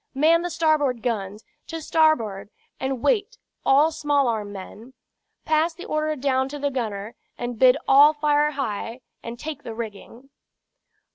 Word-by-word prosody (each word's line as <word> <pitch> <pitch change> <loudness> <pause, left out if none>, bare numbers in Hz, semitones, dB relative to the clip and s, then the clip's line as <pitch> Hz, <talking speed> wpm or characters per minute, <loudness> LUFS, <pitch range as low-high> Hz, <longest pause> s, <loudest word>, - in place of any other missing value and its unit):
Man 320 +4 +4
the 350 - -3
starboard 305 -7 +1
guns; 210 -3 -3 0.2
to 325 - -5
starboard, 295 -12 +1 0.3
and 265 -2 -3
wait, 480 0 +1 0.3
all 290 +4 +4
small 290 -3 +1
arm 215 -3 -2
men. 215 +6 -10 0.5
Pass 315 +2 +1
the 350 - -9
order 305 0 -1
down 265 -1 0
to 290 - -6
the 285 0 -1
gunner, 220 -4 -4 0.2
and 240 -2 -5
bid 255 +1 +6
all 285 +3 +7
fire 295 0 +2
high, 235 -2 -4 0.2
and 235 +1 -7
take 300 +2 -6
the 225 - -8
rigging." 230 +4 -9
270 Hz, 150 wpm, -23 LUFS, 230-310 Hz, 0.5 s, all